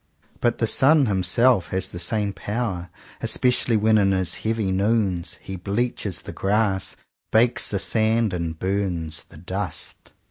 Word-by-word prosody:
But 120 -1 +1
the 115 - +1
sun 140 +5 +5
himself 105 +2 +3
has 95 0 -2
the 85 - -7
same 100 +3 0
power; 100 -6 -4 0.3
especially 125 -2 +2
when 110 +1 +3
in 95 -1 +3
his 95 -2 0
heavy 110 -3 -1
noons 95 -3 0
he 95 - -6
bleaches 100 -1 -2
the - - -8
grass, 100 -1 0 0.4
bakes 115 +2 +3
the 100 - 0
sand, 110 +1 +1
and 85 -2 -3
burns 90 -4 -2
the - - -16
dust. - - -6
100 Hz, 145 wpm, -23 LUFS, 95-115 Hz, 0.4 s, sun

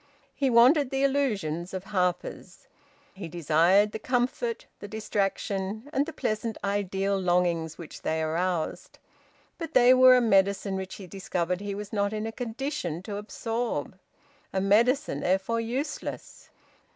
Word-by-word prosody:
He 275 -2 0
wanted 255 +4 +5
the 270 +1 -1
illusions 200 - 0
of 185 - -4
"Harper's." 190 +4 -3 0.5
He 190 -3 -7
desired 175 +5 +3
the 220 - -5
comfort, 270 - -1
the 205 - -8
distraction, 205 +1 -2
and 280 +1 +1
the - - -4
pleasant 220 +1 -2
ideal 200 -1 0
longings 175 -3 +1
which 165 - -10
they 160 0 -1
aroused. 170 +1 -2 0.6
But 330 -2 -6
they 250 0 +7
were 255 0 +8
a - - +5
medicine 195 -3 +2
which 190 0 -5
he 195 - -9
discovered 180 0 -3
he 205 -1 -4
was 205 +1 -7
not 200 0 0
in 215 0 -3
a 225 - -3
condition 225 - -4
to 200 0 -5
absorb, 225 - -3 0.6
a 190 - 0
medicine 235 +9 +2
therefore 190 +5 0
useless. 260 +6 -5
205 Hz, 140 wpm, -27 LUFS, 185-245 Hz, 0.6 s, were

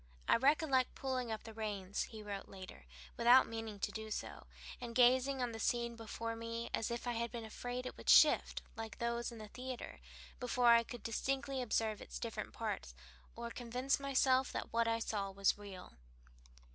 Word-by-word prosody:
"I - - +6
recollect 270 0 +3
pulling 255 -3 -2
up 220 - -4
the 225 - -9
reins," 205 -3 -3
he 220 -2 -9
wrote 200 -1 -5
later, 185 - -10 0.3
"without 245 +2 +7
meaning 225 -2 -5
to - - 0
do 220 0 -6
so, 215 - -5 0.3
and 235 -1 -6
gazing 255 +2 +4
on 245 - -1
the 225 - -6
scene 235 0 0
before 230 0 -4
me 230 +1 -5
as 225 - 0
if 235 +1 -3
I 245 - 0
had 235 0 -2
been 235 -2 -5
afraid 245 +3 -5
it 255 - -5
would - - -5
shift, - - +6
like 225 -1 -6
those 235 0 -1
in 230 - -9
a 215 - -8
theatre, 255 +2 -7 0.4
before 250 -1 +3
I 235 0 +8
could 235 -1 -8
distinctly 270 +3 -1
observe 220 -2 0
its - - -7
different - - -4
parts, - - -4 0.4
or 235 0 -5
convince 250 +4 -1
myself 265 -1 +3
that - - -4
what 230 0 +3
I 230 0 +2
saw 210 -3 -2
was 195 0 +2
real." 200 -3 -10
235 Hz, 185 wpm, -36 LUFS, 220-250 Hz, 0.4 s, I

